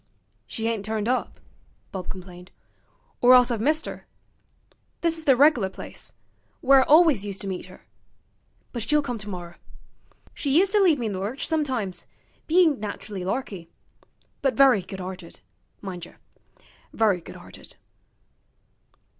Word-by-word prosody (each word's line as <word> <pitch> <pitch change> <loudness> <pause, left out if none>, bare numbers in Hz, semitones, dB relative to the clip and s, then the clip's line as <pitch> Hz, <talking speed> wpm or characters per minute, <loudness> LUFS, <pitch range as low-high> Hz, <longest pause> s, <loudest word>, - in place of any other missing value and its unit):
'She 225 0 -3
ain't 225 -3 -2
turned 215 0 -2
up,' 255 +1 -1 0.5
Bob 185 -2 -6
complained, 180 -1 -9 0.7
'or 250 +1 +8
else 250 0 +5
I've 225 -3 -1
missed 310 +5 +1
'er. - - -8 1.0
This 335 -1 +1
is 320 -1 -7
the 270 - +6
reg'lar 255 -7 +4
place - - -8 0.4
where 270 0 +6
I - - 0
alwis 310 - +6
used 200 -1 -5
to 200 - -5
meet 185 -2 -5
'er. - - -15 0.9
But 240 - -4
she'll 295 +7 +2
come 245 -4 -4
tomorrer. 180 -5 -7 0.8
She 280 0 0
used 385 +2 +4
to 420 0 +4
leave 345 -6 +4
me 240 - -3
in 215 - -1
the 190 - -4
lurch 215 +8 -2
sometimes, 260 - -2 0.4
bein' 325 -5 +4
nach'rally 205 -2 -6
larky. 190 -4 -4 0.7
But 270 -2 +1
very 265 -7 +5
good 190 +1 -9
'arted, 180 -2 -8 0.4
mindjer; 180 -3 -7 0.8
very 205 -5 +2
good - - -11
'arted.' - - -13
225 Hz, 145 wpm, -25 LUFS, 190-280 Hz, 1.0 s, or